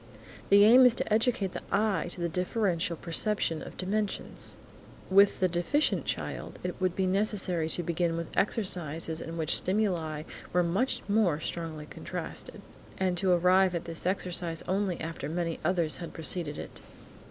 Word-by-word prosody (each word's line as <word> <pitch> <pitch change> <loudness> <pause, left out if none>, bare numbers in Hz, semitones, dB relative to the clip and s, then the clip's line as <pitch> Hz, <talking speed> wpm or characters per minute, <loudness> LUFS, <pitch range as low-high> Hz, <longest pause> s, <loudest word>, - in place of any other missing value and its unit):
The 200 +1 +7
aim 245 +4 +8
is 245 - +3
to 210 - 0
educate 220 -4 +1
the - - -6
eye 200 -4 +1
to 180 - -9
the 170 - +1
differential 180 0 -1
perception 170 -1 0
of - - -10
dimensions. 205 +2 -2 0.5
With 200 +1 +5
the 185 - +3
deficient 175 - 0
child, - - -4
it 180 +1 -5
would 185 -1 +1
be 190 - 0
necessary 185 -4 0
to 175 - -1
begin 170 0 -1
with 165 -1 -6
exercises 165 -6 +1
in 165 +1 -6
which 160 -1 -1
the - - +6
stimuli 175 -6 -1 0.3
were 180 0 +3
much 190 +10 0
more 200 -7 +2
strongly 160 -2 -5
contrasted, - - -7 0.4
and 185 -1 0
to 190 - +1
arrive 180 +1 +4
at 170 - -3
this 165 +1 -5
exercise 175 -3 +1
only 190 -1 -1
after 160 -3 -5
many 165 0 -2
others 170 -4 0
had 170 - -8
preceded 160 -2 -2
it. - - -8
180 Hz, 165 wpm, -29 LUFS, 165-200 Hz, 0.5 s, aim